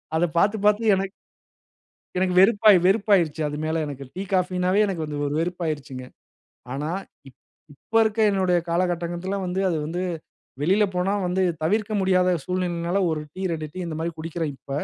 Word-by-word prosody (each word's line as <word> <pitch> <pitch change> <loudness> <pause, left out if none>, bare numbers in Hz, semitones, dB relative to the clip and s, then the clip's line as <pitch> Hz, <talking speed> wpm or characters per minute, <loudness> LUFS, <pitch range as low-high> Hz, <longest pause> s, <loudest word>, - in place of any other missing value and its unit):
அத 170 +2 +3
பாத்து 205 +5 +3
பாத்து 210 +2 +4
எனக்கு. 195 0 -2 1.1
எனக்கு 185 -1 +1
வெறுப்பாயி 205 -1 +6
வெறுப்பாயிருச்சு. 190 -7 +2
அது 150 0 -4
மேல 160 0 0
எனக்கு 140 -2 -7
டீ, 190 - -4
காஃபினாவே 185 +1 +1
எனக்கு 170 -5 -3
வந்து 150 -1 -5
ஒரு 145 - -3
வெறுப்பாகிருச்சுங்க. 155 -7 -4 0.7
ஆனா 150 +3 -3 0.4
இப் - - -24 0.4
இப்ப 225 +10 -11
இருக்கிற 220 0 +1
என்னுடைய 185 -3 +2
காலகட்டத்தில 175 +2 -1
வந்து 180 +1 -2
அது 165 - 0
வந்து 175 +3 -3 0.6
வெளியில 195 +6 +3
போனா 185 +3 +1
வந்து 185 +1 0 0.2
தவிர்க்க 215 +6 0
முடியாத 185 -1 +3 0.2
சூழ்நிலையினால 180 0 -1
1 155 -1 -2
டீ 190 - -8
2 160 -3 -3
டீ 185 - -8
இந்த 160 -2 -5
மாதிரி 165 0 -3
குடிக்கறேன் 160 -2 -3
இப்ப. 140 - -18
180 Hz, 160 wpm, -24 LUFS, 160-190 Hz, 1.1 s, வெறுப்பாயி